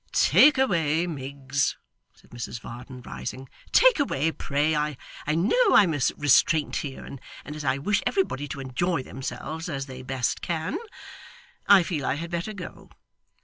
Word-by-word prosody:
'Take 295 -2 +6
away, 170 - +2
Miggs,' 140 -2 -2 0.4
said - - -24
Mrs 120 -1 -6
Varden, 125 +2 -10
rising, 130 +2 -7 0.2
'take - - +6
away, 165 - +1
pray. 150 +1 0
I 150 -1 -1 0.4
know 400 - +3
I'm 180 -6 +6
a 145 - -2 0.2
restraint 145 +1 +3
here, 135 -3 -6
and 135 - -9 0.3
as 150 +1 -7
I 130 -1 +1
wish 205 +9 0
everybody 145 - -1
to 140 - -6
enjoy 135 +4 -1
themselves 155 +6 -6
as 135 -3 -3
they 130 -1 -9
best 130 -1 -2
can, 160 -2 -2 0.9
I 200 -3 +7
feel 160 -4 -3
I 130 - 0
had 165 +3 -6
better 175 +5 -3
go. 185 -4 -9
150 Hz, 150 wpm, -26 LUFS, 135-170 Hz, 0.9 s, I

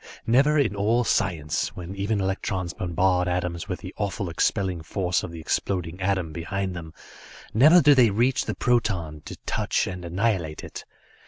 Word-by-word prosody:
Never 140 +6 +4
in 120 -9 +2
all 110 +5 +2
science, 85 -10 0
when 90 +1 -7
even 100 +2 -1
electrons 95 -2 -2
bombard 90 +1 +1
atoms 90 +1 -2
with 90 - -4
the 95 -1 -8
awful 100 -3 -2
expelling 95 0 0
force 90 +2 -1
of - - -6
the 85 - -8
exploding 90 +2 -2
atom 95 -4 0
behind 95 +3 -3
them, 80 -2 -7 0.6
never 155 +10 +7
do 145 +1 +7
they 125 -4 +5
reach 120 +6 +1
the - - -3
proton, 95 -11 0
to - - -7
touch - - 0
and 90 -1 -6
annihilate 90 -3 -1
it. - - -8
95 Hz, 165 wpm, -25 LUFS, 85-110 Hz, 0.6 s, never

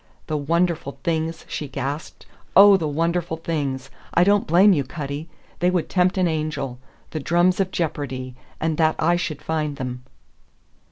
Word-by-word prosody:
"The 155 - -3
wonderful 165 0 0
things!" 165 0 -2
she 150 - -4
gasped. 140 +3 -5 0.3
"Oh, 200 0 +9
the 165 -5 0
wonderful 165 +2 -1
things! 140 -5 -3 0.2
I 175 - +6
don't 200 +2 +3
blame 185 +5 +6
you, 145 -5 +1
Cutty. 145 +2 -6 0.3
They 180 - +3
would 180 -3 0
tempt 185 +1 +2
an 185 -1 +3
angel. 150 -6 -3 0.3
The 155 - -3
drums 175 +5 +2
of 190 -1 +1
jeopardy; 135 -7 -3 0.3
and 160 -1 -1
that 160 -1 +3
I 170 +2 +3
should 155 -4 -3
find 155 -2 -1
them!" 125 -2 -5
160 Hz, 160 wpm, -23 LUFS, 145-175 Hz, 0.3 s, Oh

